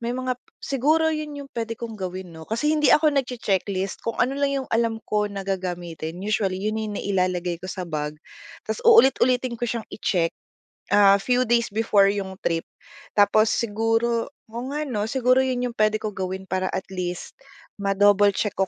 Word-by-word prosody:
may 235 0 -3
mga 255 0 -1 0.2
siguro 310 +4 +1
yun 305 -1 -4
yung 280 -1 -9
puwede 230 -1 -4
kong 230 -1 -6
gawin 185 -1 -5
'no? 160 0 -11
Kasi 300 +8 +1
hindi 300 -1 +3
ako 305 -1 +5
nagche-checklist. 200 -7 -1
Kung 230 - -3
ano 255 +2 +2
lang 280 0 +1
yung - - -18
alam 225 -1 +1
ko 210 -1 0
na 195 -1 -5
gagamitin, 175 -3 -4
usually 200 -3 0
yun 215 +3 -2
na 220 - -2
yung 205 - -5
nailalagay 180 -3 -1
ko 185 - -6
sa 185 - -4
bag, 150 -1 -3 0.5
ta's - - -3
uulit-ulitin 260 - +5
ko - - 0
siyang 230 -1 -3
i-check, 170 -5 0 0.6
ah, 200 -1 +7
few 250 +4 +1
days 235 -2 +2
before 205 -2 +3
yung 195 -2 -4
trip. 165 -1 -1 0.5
Tapos 215 +1 +5
siguro 225 +1 0 0.2
oo 235 +2 -5
nga 300 - -1
'no? 215 -7 -2
Siguro 255 +1 +3
yun 250 -2 0
yung - - -19
puwede 215 0 +3
kong 215 -1 -5
gawin 190 0 -3
para 185 0 0
at 190 - -3
least, 180 -1 -4 0.5
ma-double 200 0 +4
check 210 - 0
ko 195 -1 0
215 Hz, 185 wpm, -24 LUFS, 190-245 Hz, 0.6 s, ah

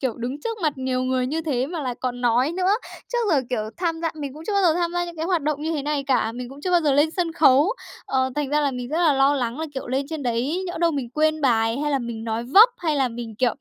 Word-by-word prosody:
kiểu, 260 -3 0
đứng 250 +5 -4
trước 455 +5 -4
mặt 310 -2 +2
nhiều 260 -1 -1
người 255 0 0
như 310 +5 -2
thế 265 -5 -1
mà 330 +1 -5
lại 250 -2 -2
còn 245 -1 -3
nói 245 +5 +2
nữa. 370 +2 +1 0.4
Trước 485 - +1
giờ, 290 - +4
kiểu, 235 -4 0
tham 335 -2 -2
gia 330 -1 0
mình 285 -3 -6
cũng 310 +2 -10
chưa 425 - -1
bao 400 -1 +2
giờ 335 -3 +4
tham 345 0 -1
gia 350 0 0
những 345 -1 -8
cái 320 - -3
hoạt 350 -4 +1
động 300 0 -1
như 320 - -1
thế 300 -3 -2
này 290 -1 -1
cả, 260 -4 +1
mình 245 +1 -6
cũng 275 +2 -11
chưa 365 - -2
bao 350 -1 +4
giờ 295 -3 +2
lên 290 +3 +3
sân 340 -1 -2
khấu! 305 +3 +5 0.3
Ờ, 260 0 +1
thành 295 -2 -1
ra 300 +1 +2
là 285 -1 +1
mình 250 -2 -5
rất 310 +4 -1
là 335 -4 +4
lo 270 +1 +3
lắng 245 -1 -2
là, 320 - -2
kiểu, 265 - -5
lên 265 +2 -1
trên 315 -3 -4
đấy 255 +9 -1
nhỡ 350 - -5
đâu 340 0 +3
mình 275 -6 -3
quên 310 +3 +1
bài 230 -2 +2
hay 295 0 -1
là 280 - +2
mình 235 -3 -5
nói 225 +1 -2
vấp, 390 - +7
hay 315 -4 0
là 265 -2 +2
mình, 230 -1 -7
kiểu 250 -2 +2
285 Hz, 305 wpm, -23 LUFS, 255-325 Hz, 0.4 s, vấp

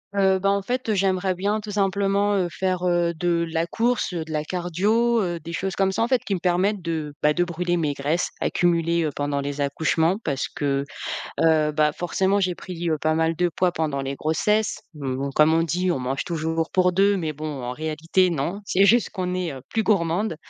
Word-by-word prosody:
Heu, 190 -1 +3
ben 195 +1 +2
en 200 0 +1
fait, 250 +5 -3
heu, - - +3
j'aimerais 190 -1 +1
bien 200 +4 -1
tout 210 0 -7
simplement, 200 0 +1
heu, 185 -3 +1
faire, 185 -1 -1
heu, 175 -1 +2
de 170 0 0
la 165 0 0
course, 230 +2 0
heu, 170 -2 -2
de 160 - -10
la 150 -1 -1
cardio, 200 +8 +1
heu, 175 -2 -2
des 165 +2 -8
choses 190 +2 -2
comme 195 -1 +2
ça 190 - 0
en - - +1
fait 255 0 +2
qui 200 - -1
me - - -3
permettent 185 +3 +1
de, 160 -3 -3
bah, 150 0 +4
de 175 - +2
brûler 175 0 -1
mes 155 -4 0
graisses 145 +5 -1
accumulées, 170 -1 +1
heu, - - 0
pendant 145 0 -1
les 140 +1 -4
accouchements. 160 +6 +1
Parce 140 -3 -1
que, 140 -1 0 0.6
heu, 155 -2 +3
bah, 150 0 +2
forcément 190 +4 0
j'ai 185 -2 +1
pris, 175 -1 -5
heu, 155 - +1
pas 155 0 +2
mal 160 0 +1
de 175 +1 +1
poids 180 +2 +1
pendant 155 -5 -2
les 135 +1 -4
grossesses. 210 +9 0
Mmh, 135 -4 -4
bon 140 +1 -2
comme 155 +3 +4
on 165 - +3
dit 180 +3 0
on - - 0
mange 130 +2 -2
toujours 160 -1 -2
pour 180 -1 +3
2, 200 +2 +3
mais 160 -4 -2
bon 150 -3 -5
en 120 - -3
réalité 160 +6 0
non. 170 +4 -2
C'est 195 +1 +3
juste 235 +4 +4
qu'on 180 -2 -3
est, 180 -2 -2
heu, 135 - -9
plus 225 - 0
gourmande 185 -1 +1
175 Hz, 225 wpm, -24 LUFS, 155-190 Hz, 0.6 s, bah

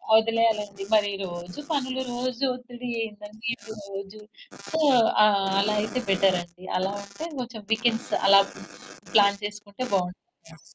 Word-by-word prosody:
వదిలేయాలండి 220 -3 +2
మరి 205 -1 +3
రోజు 175 +5 -7
పనులు 260 -2 -1
రోజు 250 +1 -3
ఒత్తిడి 245 0 -8 0.2
ఏందండి 215 +2 -6 1.2
సో, 320 - 0 0.8
అలా 210 +1 +2
అయితే 235 +4 -2
బెటరండి. 185 -2 +1
అలా 190 +2 0
అంటే 200 +12 -7
కొంచెం 235 -3 -6
వీకెండ్స్ 225 +1 +1 0.2
అలా 195 0 +9 0.7
ప్లాన్ 200 -1 +5
చేసుకుంటే 205 +3 -6
బావుంటదండి. 180 -3 -4
210 Hz, 105 wpm, -26 LUFS, 195-240 Hz, 1.2 s, అలా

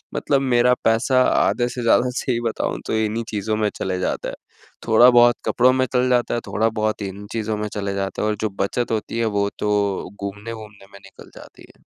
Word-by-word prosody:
मतलब 140 -2 +1
मेरा 125 -2 +3
पैसा 130 +3 +3
आधे 120 -1 +1
से 125 - -5
ज़्यादा 120 +2 +3
सही 125 -3 -1
बताऊँ - - -3
तो - - -2
इन्हीं 110 +1 -1
चीज़ों 110 0 -2
में 105 -1 +1
चले 95 -1 -3
जाते 90 - -2
है। - - -7 0.5
थोड़ा 115 +2 +7
बहुत 120 -1 +5
कपड़ों 125 +1 +3
में 130 0 +1
चल 125 0 +2
जाता 125 -1 +1
है, - - 0
थोड़ा 110 +2 +1
बहुत 110 -1 -2
इन 100 +1 -7
चीज़ों 110 -1 -2
में 105 0 -3
चले 100 -1 -3
जाते 95 0 -3
है - - 0
और 105 - 0
जो 110 - 0
बचत 115 +5 -1
होती 115 +1 -2
है 115 - +1
वो 100 0 +1
तो 100 -3 -1
घूमने-वूमने 105 0 -8
में 100 - -12
निकल 95 -1 -15
जाती - - -15
है। - - -30
110 Hz, 210 wpm, -21 LUFS, 105-120 Hz, 0.5 s, थोड़ा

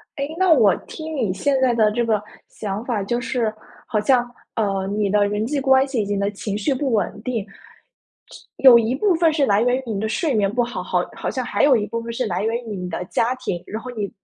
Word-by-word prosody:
哎， 280 -2 -2
那 375 -1 +3
我 225 - +5
听 315 0 -7
你 225 -9 0
现 270 +8 0
在 255 -2 +3
的 220 -2 +3
这 235 +2 0
个 215 -2 +1 0.3
想 210 +2 -5
法， 230 -5 -1
就 240 +4 -1
是， 230 -2 -1 0.3
好 215 -3 0
像， 245 +1 +2 0.3
呃， 195 -3 -1
你 205 0 -1
的 205 0 +3
人 210 +1 -1
际 280 +4 -1
关 265 0 +4
系 265 -5 -1
以 - - -2
及 205 - -2
你 200 - -1
的 200 0 0
情 200 0 -5
绪 215 +7 0
不 265 -1 -1
稳 210 0 -1
定， 235 -4 -2
是 - - -23 0.5
有 255 -3 +8
一 230 +2 0
部 370 +7 +2
分 330 0 +3
是 300 -2 +2
来 205 -3 +3
源 245 +1 +2
于 265 - -4
你 215 -4 -3
的 220 - -1
睡 290 +5 0
眠 200 -2 +1
不 245 +2 +1
好， 240 0 -4
好 - - 0
好 - - -4
像 - - -3
还 - - -1
有 280 -3 +6
一 210 -2 -1
部 230 +2 -4
分 235 - -6
是 245 +2 -2
来 185 -1 -2
源 225 +2 0
于 215 -3 -6
你 180 -1 -5
的 180 +1 -4
家 235 +5 0
庭。 180 -9 -4
然 220 +2 -6
后 250 - -7
你 210 -4 -4
230 Hz, 280 characters per minute, -21 LUFS, 205-260 Hz, 0.5 s, 有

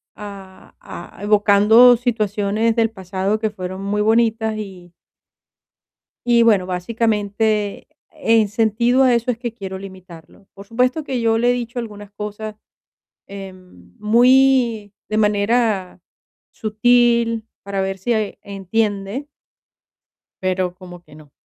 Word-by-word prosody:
A 195 -2 -11
ah, 175 - -11
evocando 210 +4 +6
situaciones 220 -2 0
del 225 -1 +2
pasado 190 +1 -3
que 220 0 -1
fueron 185 -1 -7
muy 205 +1 -1
bonitas, 220 0 +1
y 185 -4 -9 1.3
y, 235 -1 +4
bueno, 210 -5 +3
básicamente, 210 +2 -1 0.2
en 225 -9 +2
sentido 230 +4 +2
a 255 -2 +4
eso 235 +1 +1
es 230 - -6
que 240 -2 -5
quiero 190 -4 -7
limitarlo. 185 -1 -13
Por 200 0 -12
supuesto 250 +7 0
que 260 -4 -3
yo 225 -1 +2
le 240 +2 +2
he - - +2
dicho 245 0 -4
algunas 205 -3 -8
cosas, 210 +1 -7 0.7
em, 185 - -12
muy 240 -1 +3 0.2
de 215 - -1
manera 210 -2 0 0.5
sutil, 235 0 +2 0.2
para 195 -1 -3
ver 190 0 -3
si 235 +6 -1
e 215 -2 -2
entiende 200 +4 -3 1.2
pero 185 -1 -1
como 180 -2 -12
que 155 -3 -18
no. 150 -2 -16
210 Hz, 125 wpm, -19 LUFS, 195-230 Hz, 1.3 s, evocando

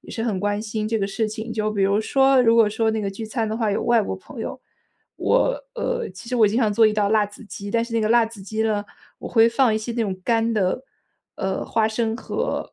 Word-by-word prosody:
也 - - -14
是 225 - -4
很 210 -5 -1
关 205 +1 -1
心 215 -1 -3
这 225 0 0
个 195 - 0
事 215 +2 -1
情。 220 +1 -6
就 215 -1 -1
比 200 -2 -1
如 200 +2 +3
说， 270 +3 +4
如 230 -1 +4
果 230 -2 +6
说 220 +1 0
那 220 - -1
个 200 -1 -2
聚 220 +3 -7
餐 225 0 -2
的 215 - -3
话 220 -3 0
有 200 - -1
外 235 -2 +3
国 - - -4
朋 - - -11
友， - - -5 0.6
我， - - +1
呃， 470 - -2
其 190 +5 -11
实 250 - 0
我 215 -3 +5
经 220 - -1
常 215 -4 +2
做 220 +1 +5
一 215 - +1
道 205 -1 +1
辣 215 -1 +3
子 205 +3 -13
鸡， 200 0 -8
但 230 +1 +1
是 235 - -10
那 230 - +2
个 215 - +1
辣 235 0 +5
子 225 -2 -9
鸡 215 +3 -2
呢， 210 -2 0 0.4
我 - - -7
会 225 -1 +5
放 230 -1 +2
一 - - +1
些 220 +2 -5
那 235 - -2
种 190 -3 -3
干 230 -1 +1
的， 205 +4 0 0.5
呃， 190 0 -2
花 220 -1 +1
生 220 0 -1
和 - - -3
220 Hz, 290 characters per minute, -23 LUFS, 210-230 Hz, 0.6 s, 果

